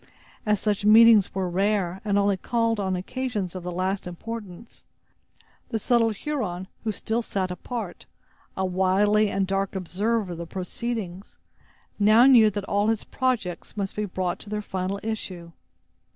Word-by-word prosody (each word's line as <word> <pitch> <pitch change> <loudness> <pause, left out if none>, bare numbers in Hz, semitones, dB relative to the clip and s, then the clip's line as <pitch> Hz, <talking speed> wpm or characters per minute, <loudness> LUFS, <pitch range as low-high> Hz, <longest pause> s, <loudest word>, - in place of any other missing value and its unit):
As 210 -1 +3
such 205 -1 -1
meetings 220 -1 +7
were 190 -1 0
rare, 190 0 0
and 205 -2 +1
only 200 0 +3
called 230 +3 0
on 190 -2 0
occasions 210 -1 -3
of 185 - -6
the 180 +1 -5
last 185 +2 -2
importance, 210 +2 -8 0.9
the 230 - -1
subtle 230 +1 +3
Huron, 210 -7 -3 0.2
who 220 - 0
still 220 +3 -2
sat 190 -5 -2
apart, 195 +1 -6 0.5
a 190 - 0
wily 195 +3 +3
and 195 -1 0
dark 195 +1 -1
observer 195 +3 -1
of 170 - -6
the 170 - -6
proceedings, 195 +1 -5 0.6
now 215 +4 +6
knew 240 -5 +7
that 205 -1 -4
all 205 +1 +1
his 225 -1 0
projects 220 -9 -2
must 195 -1 -3
be 210 - -1
brought 180 -2 -2
to 205 - -10
their 210 0 -3
final 190 0 -3
issue. 185 -6 -5
200 Hz, 155 wpm, -25 LUFS, 185-220 Hz, 0.9 s, meetings